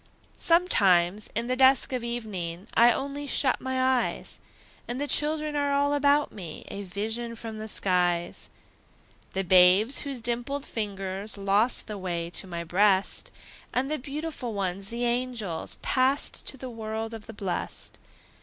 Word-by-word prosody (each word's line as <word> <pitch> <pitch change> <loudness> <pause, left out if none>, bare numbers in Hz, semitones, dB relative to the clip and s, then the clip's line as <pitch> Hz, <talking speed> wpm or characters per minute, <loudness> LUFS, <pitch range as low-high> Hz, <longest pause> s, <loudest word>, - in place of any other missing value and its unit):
Sometimes, 205 - +3
in 230 +2 -1
the 255 +1 0
dusk 265 0 +4
of 250 -2 -2
evening, 200 -7 -4
I 235 +1 +6
only 280 +3 -3
shut 270 -2 +2
my 260 0 -2 0.3
eyes, - - -5 0.5
And 245 +2 -4
the 290 - 0
children 300 +1 +1
are 285 -1 +1
all 285 +1 +2
about 290 0 +3
me, 175 -6 -8
A 200 - -5
vision 220 +5 -4
from 220 -1 -7
the 215 - -5
skies: 180 -4 0 0.8
The 195 - -1
babes 185 +7 +6
whose 275 -3 -4
dimpled 245 +4 -2
fingers 200 -1 -3
Lost 200 +5 +3
the 210 -2 -6
way 170 -2 -3
to 190 - -2
my 170 -1 -4
breast, 190 +3 +2 0.5
And 265 +3 0
the 310 - -1
beautiful 280 -4 -5
ones, 195 0 -2
the 235 +1 -2
angels, 235 -8 -2
Passed 265 +2 +1
to 270 - -4
the 260 - -6
world 220 0 -4
of 225 -2 -9
the 225 - -8
blest. 195 -4 -4
225 Hz, 155 wpm, -27 LUFS, 195-265 Hz, 0.8 s, I